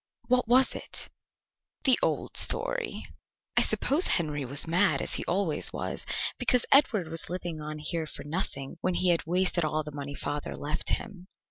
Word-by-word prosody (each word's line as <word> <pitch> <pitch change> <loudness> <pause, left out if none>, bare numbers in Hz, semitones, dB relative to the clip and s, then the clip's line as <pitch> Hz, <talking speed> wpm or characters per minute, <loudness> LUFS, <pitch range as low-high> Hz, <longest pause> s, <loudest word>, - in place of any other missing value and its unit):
"What 250 -2 +2
was 255 +2 +4
it?" - - -6 0.7
"The 265 -4 +5
old - - -2
story." - - +2 0.5
"I - - +5
suppose 310 +7 +4
Henry 150 -4 0
was 140 +3 +2
mad, 180 +4 +2
as - - -1
he - - +3
always 180 -3 -1
was, - - -5 0.3
because 250 -2 +2
Edward 230 - +4
was 165 +1 +2
living 175 -3 -5
on 150 0 -7
here 160 +1 -4
for - - -8
nothing, 145 -2 -3
when 185 -1 -1
he 180 - +1
had 165 -3 0
wasted 180 0 +2
all 155 0 -1
the 150 - -9
money 145 0 -7
father 145 +1 -5
left 150 +2 -3
him." 195 -5 -4
170 Hz, 170 wpm, -27 LUFS, 150-205 Hz, 0.7 s, The